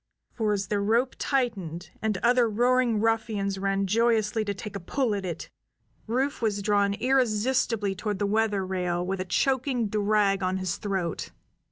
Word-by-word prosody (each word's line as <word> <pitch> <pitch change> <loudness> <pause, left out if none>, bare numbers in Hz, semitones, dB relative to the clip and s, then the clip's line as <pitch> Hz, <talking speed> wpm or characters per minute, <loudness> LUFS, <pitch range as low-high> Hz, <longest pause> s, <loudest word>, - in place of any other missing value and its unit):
For 220 -3 -1
as 195 -1 -2
the 205 - +1
rope 230 +6 +1
tightened, 200 - -2
and 215 -3 0
other 240 -1 +4
roaring 245 0 +2
ruffians 215 -3 0
ran 195 0 0
joyously 220 +1 +2
to 205 - -1
take 205 +1 -7
a - - -3
pull 240 +5 -1
at 200 -1 -2
it, 170 - -6 0.6
Rufe 260 +5 -1
was 205 -3 0
drawn 200 -1 +2
irresistibly 230 -4 +1
toward 205 +1 -3
the 205 - 0
weather 210 -2 +1
rail 180 -2 -1
with 190 +1 -2
a - - -3
choking 255 +2 0
drag 205 -1 +2
on 185 0 0
his 185 -2 -2
throat. 190 -5 -3
210 Hz, 165 wpm, -27 LUFS, 195-230 Hz, 0.6 s, other